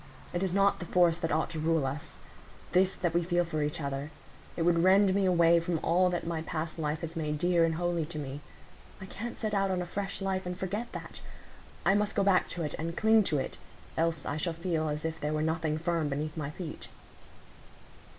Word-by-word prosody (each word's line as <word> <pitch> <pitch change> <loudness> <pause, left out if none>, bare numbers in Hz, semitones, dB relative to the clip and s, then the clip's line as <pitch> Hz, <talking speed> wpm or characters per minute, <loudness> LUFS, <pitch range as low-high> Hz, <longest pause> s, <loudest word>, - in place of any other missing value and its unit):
It 175 - -1
is 190 -2 0
not 200 +2 +3
the 175 - -5
force 175 -1 +3
that 165 -2 -1
ought 155 +1 0
to 160 - -4
rule 160 -2 +2
us,—this 160 +6 -2
that 175 -3 -1
we 170 - +3
feel 175 0 +1
for 155 -2 -2
each 150 +1 -2
other; 140 0 -3 0.5
it 165 - +1
would 170 0 +3
rend 190 +2 +5
me 195 -1 +2
away 170 -1 +5
from 170 0 -1
all 180 +2 +3
that 175 -1 -2
my 165 -1 -2
past 160 0 -4
life 150 0 -1
has 165 0 -5
made 150 -2 -1
dear 175 +1 +3
and 165 -1 +2
holy 170 -2 -1
to 165 -1 -7
me. 145 -1 -5 0.6
I 190 - -7
can't 225 +5 -6
set 215 -2 -2
out 195 -1 +2
on 185 -1 0
a 180 - -2
fresh 195 +3 -4
life, 190 -1 -2
and 180 0 -4
forget 205 +6 -3
that; - - -7 0.6
I 195 - +5
must 210 +1 +1
go 200 - +3
back 190 -2 +3
to 170 - -4
it, 150 - -3
and 165 +1 -3
cling 220 0 +5
to 150 - +2
it, 130 - -4 0.4
else 165 -2 0
I 145 - -2
shall 165 +2 -1
feel 165 -2 -1
as 150 +1 -3
if 160 0 -3
there 150 +1 -1
were 155 0 0
nothing 160 -1 0
firm 165 -2 0
beneath 150 +2 -3
my 150 -3 -3
feet." 155 0 -7
170 Hz, 225 wpm, -30 LUFS, 155-185 Hz, 0.6 s, rend